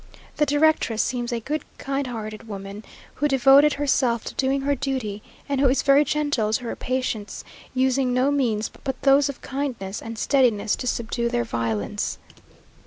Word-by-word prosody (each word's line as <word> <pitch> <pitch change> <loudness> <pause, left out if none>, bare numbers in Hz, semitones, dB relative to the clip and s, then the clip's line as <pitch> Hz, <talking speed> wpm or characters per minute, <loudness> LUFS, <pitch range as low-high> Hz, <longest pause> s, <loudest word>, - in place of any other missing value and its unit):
The 300 - +2
directress 290 -6 +2
seems 245 -1 -2
a 235 - -1
good 295 +6 -3 0.2
kind 275 0 -2
hearted 220 -2 -6
woman, 200 0 -7 0.3
who 295 - 0
devoted 275 +2 +6
herself 260 -5 +1
to - - -6
doing 270 +1 0
her 285 +1 +1
duty, 245 -7 -3 0.3
and 280 -2 0
who 275 - +5
is 265 - +1
very 280 +1 +5
gentle 290 -7 0
to 245 - 0
her 235 - -4
patients; 250 -5 -3 0.3
using 260 0 +2
no 255 +3 +2
means 230 -7 0
but 265 -2 -3
those 280 +1 +5
of 280 - -7
kindness 255 -8 -4
and 225 0 -7
steadiness 230 -6 +2
to 250 - -5
subdue 235 0 -1
their 240 0 0
violence. 115 - -2
255 Hz, 170 wpm, -24 LUFS, 225-275 Hz, 0.3 s, devoted